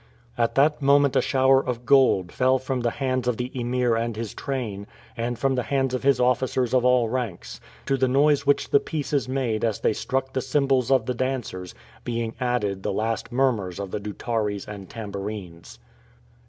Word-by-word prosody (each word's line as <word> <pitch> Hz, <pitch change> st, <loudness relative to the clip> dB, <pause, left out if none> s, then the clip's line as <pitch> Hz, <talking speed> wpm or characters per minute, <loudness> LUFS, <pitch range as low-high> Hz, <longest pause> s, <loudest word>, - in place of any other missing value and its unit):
At 115 Hz, -1 st, 0 dB
that 150 Hz, +2 st, +3 dB
moment 140 Hz, 0 st, +4 dB
a -, -, +4 dB
shower 135 Hz, 0 st, +3 dB
of 125 Hz, -1 st, -4 dB
gold 125 Hz, -10 st, +4 dB
fell 130 Hz, +1 st, +2 dB
from 130 Hz, 0 st, -3 dB
the 120 Hz, -, +1 dB
hands 130 Hz, 0 st, -2 dB
of 125 Hz, -2 st, +1 dB
the 125 Hz, +1 st, -4 dB
Emir 125 Hz, -1 st, 0 dB
and 115 Hz, 0 st, -2 dB
his 115 Hz, -1 st, -5 dB
train, 110 Hz, -8 st, -4 dB, 0.3 s
and 120 Hz, +1 st, -3 dB
from 135 Hz, +2 st, +1 dB
the 125 Hz, -, 0 dB
hands 135 Hz, 0 st, -1 dB
of 130 Hz, -, -1 dB
his 135 Hz, -2 st, +3 dB
officers 125 Hz, 0 st, +1 dB
of 125 Hz, -1 st, +3 dB
all 125 Hz, -2 st, +4 dB
ranks; 115 Hz, -6 st, -4 dB, 0.2 s
to 135 Hz, -, +1 dB
the 130 Hz, 0 st, +2 dB
noise 140 Hz, +2 st, +3 dB
which 145 Hz, 0 st, +1 dB
the 140 Hz, -, +6 dB
pieces 145 Hz, -4 st, -2 dB
made 125 Hz, -5 st, -1 dB
as 110 Hz, -3 st, -1 dB
they -, -, +2 dB
struck 130 Hz, +3 st, -2 dB
the 130 Hz, -, 0 dB
cymbals 135 Hz, -1 st, +1 dB
of 130 Hz, -4 st, +3 dB
the 125 Hz, -, -1 dB
dancers, 120 Hz, -8 st, -4 dB, 0.3 s
being 115 Hz, -2 st, -3 dB
added 115 Hz, -6 st, -1 dB
the -, -, -2 dB
last 110 Hz, +4 st, -2 dB
murmurs 115 Hz, -8 st, 0 dB
of 100 Hz, -2 st, -5 dB
the -, -, -2 dB
doutares 105 Hz, 0 st, -3 dB
and 100 Hz, -3 st, -8 dB
tambourines. 100 Hz, -5 st, -7 dB
125 Hz, 190 wpm, -24 LUFS, 110-135 Hz, 0.3 s, the